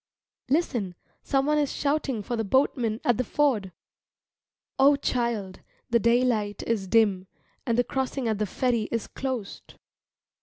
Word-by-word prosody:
Listen, 240 - 0 0.3
someone 285 +2 +1
is 290 -2 0
shouting 280 -6 -1
for 240 - -3
the 225 - -1
boatman 235 -1 +1
at 240 -3 +3
the 255 - +1
ford. 245 -9 +1 1.1
O 280 +2 +6
child, 235 -8 -2 0.3
the 235 - +4
daylight 235 -3 +1
is 215 -4 -1
dim, 200 -3 +3 0.4
and 230 -1 +1
the 245 - +4
crossing 265 -1 -2
at 215 -2 0
the 210 - 0
ferry 235 +1 0
is 230 -2 -1
closed. 255 -7 -5
235 Hz, 140 wpm, -26 LUFS, 215-265 Hz, 1.1 s, O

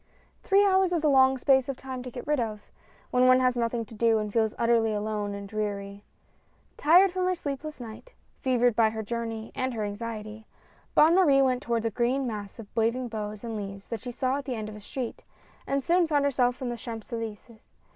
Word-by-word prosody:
Three 400 +1 +4
hours 380 -2 +3
is 330 -2 0
a - - +4
long 265 -1 +5
space 265 0 +3
of 270 - -3
time 260 -1 -6
to 250 - -7
get 245 0 -8
rid 295 -1 +1
of, 215 -3 -4 0.4
when 250 0 +4
one 255 0 +6
has 255 -1 +2
nothing 235 -1 -1
to 220 - -14
do, 225 +1 +3
and 210 -1 -3
feels 220 -2 +1
utterly 230 -1 +2
alone 210 -1 -2
and 200 0 -7
dreary. 200 -1 -4 0.7
Tired 355 +5 +5
from 370 0 -1
her 370 - +1
sleepless 300 -2 -5
night, 240 - -10 0.2
fevered 245 -3 +2
by 225 -1 +4
her 220 0 -5
journey 225 0 -4
and 260 -2 -2
her 215 - -2
anxiety, 215 +1 -6 0.5
Bonne 315 +2 +6
Marie 290 -7 +5
went 255 -1 +1
toward 230 -1 -1
a 225 - 0
green 250 +5 0
mass 210 -4 -5
of 225 - -8
waving 235 +2 0
boughs 210 -1 -5
and 230 -1 -4
leaves 200 -1 -7
that 230 -3 -4
she 250 - -6
saw 255 +2 -1
at 285 - -6
the 260 -3 -3
end 215 -1 -5
of 215 - -9
a 210 - -10
street, 245 +3 -6 0.4
and 275 0 0
soon 345 +2 +3
found 290 -2 +2
herself 250 -1 +1
on 250 - -2
the 240 - -4
Champs 225 -2 -8
Elyse^s. 225 0 -6
235 Hz, 215 wpm, -27 LUFS, 220-265 Hz, 0.7 s, one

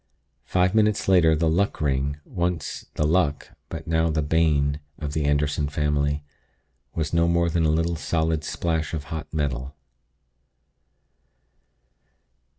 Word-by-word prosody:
Five 90 +1 +2
minutes 105 -1 +2
later 85 -4 +5
the 80 +1 +1
Luck 90 +6 +1
Ring, 70 0 0
once 85 -3 -3
the 75 - +1
'luck,' 75 -2 +1 0.2
but 80 -1 -6
now 80 0 +1
the 80 -1 0
'bane,' 75 -2 +2 0.2
of 75 -2 -5
the 75 -2 0
Anderson 75 0 +1
family, 75 0 0 0.7
was 80 -1 -2
no 85 0 +3
more 85 0 +2
than 85 -1 +1
a - - +3
little 85 +2 +1
solid 80 -1 0
splash 80 0 -2
of 75 - -4
hot 80 -1 -5
metal." 70 -3 -2
80 Hz, 135 wpm, -24 LUFS, 75-85 Hz, 0.7 s, later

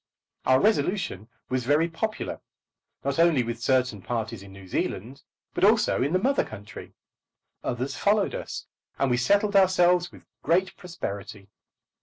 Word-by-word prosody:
Our 130 0 +5
resolution 180 - 0 0.2
was 130 -1 -1
very 145 +6 +3
popular, 215 +6 -4 0.6
not 140 +2 -1
only 165 -6 +4
with 115 0 -5
certain 125 -5 +1
parties 115 -1 -3
in 100 0 -12
New 95 -1 -12
Zealand, 115 +8 -3 0.3
but - - -2
also 215 - +4
in 140 +4 +1
the 185 - +3
mother 270 +8 +2
country. 105 -1 -10 0.7
Others 125 +3 -3
followed 205 0 +2
us, - - -5 0.3
and 135 -2 +1
we 125 - +3
settled 205 - +2
ourselves 180 -2 +4
with - - -16 0.2
great 185 +3 +1
prosperity. 100 - -7
140 Hz, 145 wpm, -26 LUFS, 115-185 Hz, 0.7 s, Our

